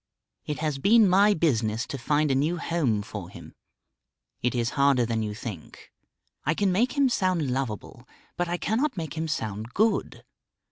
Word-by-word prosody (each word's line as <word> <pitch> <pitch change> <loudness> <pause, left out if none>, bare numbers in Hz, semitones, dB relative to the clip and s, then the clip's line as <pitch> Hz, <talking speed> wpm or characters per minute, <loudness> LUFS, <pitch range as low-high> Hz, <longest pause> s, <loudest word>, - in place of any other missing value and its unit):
It 150 - -2
has 150 -3 -1
been 220 +6 +5
my 200 +3 +5
business 120 -7 0
to 140 - -5
find 150 +3 +1
a - - +3
new 150 +6 +1
home 145 -11 0
for 100 -4 -7
him. - - -12 0.9
It 125 +1 0
is 120 -1 0
harder 140 -3 +3
than 115 -1 -1
you 105 -1 -3
think. 105 -7 -9 0.5
I 150 - +1
can 200 0 +1
make 235 +7 +1
him 280 -2 +3
sound 185 - 0
lovable, 125 -6 -4 0.3
but 175 0 -1
I 175 - -1
cannot 245 +7 -1
make 160 -3 -4
him 160 0 -2
sound 110 -5 -4
good. 220 +2 0
150 Hz, 175 wpm, -26 LUFS, 115-185 Hz, 0.9 s, been